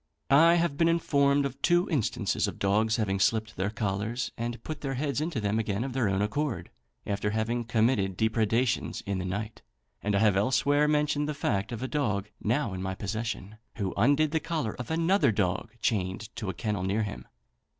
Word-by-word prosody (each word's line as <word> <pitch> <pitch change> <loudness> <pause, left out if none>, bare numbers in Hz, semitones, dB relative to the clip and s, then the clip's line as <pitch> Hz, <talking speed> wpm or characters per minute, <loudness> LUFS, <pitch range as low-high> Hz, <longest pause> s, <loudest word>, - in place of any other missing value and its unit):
I 165 +5 +7
have 170 -4 +1
been 165 - +4
informed 140 -4 +3
of 135 -1 -5
two 175 +1 +3
instances 145 - 0
of - - -5
dogs 110 +3 +2
having 100 -4 0
slipped 110 +2 +1
their 95 +3 -1
collars 105 +3 -2
and 115 0 -4
put 155 -1 -6
their 135 -2 -2
heads 140 +1 -1
into 155 -5 -2
them 105 +1 0
again 105 0 -1
of 135 -1 -4
their 120 -5 +1
own 95 +1 +1
accord, 140 +5 -2 0.3
after 105 0 -1
having 115 +3 -1
committed 110 -5 +1
depredations 115 +3 +1
in 100 -1 -2
the 90 - -3
night, 105 +4 -4 0.4
and 105 -1 0
I - - +3
have 105 -3 +4
elsewhere 135 +7 +3
mentioned 150 0 +1
the 150 - -2
fact 105 -6 -1
of 120 +1 -4
a - - -1
dog, 105 -9 -1
now 115 -1 0
in 95 - -4
my 95 0 -3
possession, 110 0 -4 0.2
who 100 -5 -2
undid 145 +4 +3
the 160 - +1
collar 155 -10 -2
of 125 - -5
another 165 - +3
dog 95 -1 -1
chained 105 +1 -1
to 105 -4 -3
a - - -2
kennel 105 -2 -2
near 100 +4 0
him. 65 - -6
115 Hz, 195 wpm, -28 LUFS, 100-140 Hz, 0.4 s, I